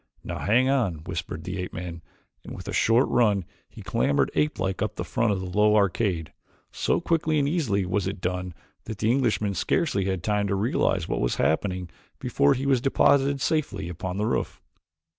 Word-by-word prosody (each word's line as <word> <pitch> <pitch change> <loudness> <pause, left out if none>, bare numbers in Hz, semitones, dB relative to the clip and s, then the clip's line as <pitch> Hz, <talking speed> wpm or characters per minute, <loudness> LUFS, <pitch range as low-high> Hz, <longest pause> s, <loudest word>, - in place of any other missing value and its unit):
"Now, - - -5
hang 120 +5 +3
on," 105 - 0
whispered 85 -2 -5
the 95 +2 -5
ape 90 - -5
man, 85 -1 -6 0.4
and - - -8
with - - -9
a - - -4
short 115 +4 +3
run 105 -6 +2 0.2
he - - -12
clambered 70 - +1
apelike 95 +6 -1
up 105 - -1
the - - -3
front 115 -4 0
of 100 - 0
the 95 - -5
low 105 0 +4
arcade. 100 -5 +1 0.4
So - - 0
quickly 160 -2 +1
and 140 -1 +2
easily 125 - 0
was 95 +1 -1
it 95 0 -4
done 90 -1 -3 0.3
that 110 -2 -6
the 110 +3 +1
Englishman 115 -6 +1
scarcely 100 - 0
had 95 -3 -2
time 105 0 +1
to 100 - 0
realize 95 - 0
what - - -2
was - - 0
happening 90 +2 0 0.3
before 70 - +2
he 135 - -3
was 135 -3 +3
deposited 140 +1 +3
safely 135 - -1
upon 90 +2 -5
the 105 - 0
roof. 115 - -2
100 Hz, 190 wpm, -26 LUFS, 90-125 Hz, 0.4 s, low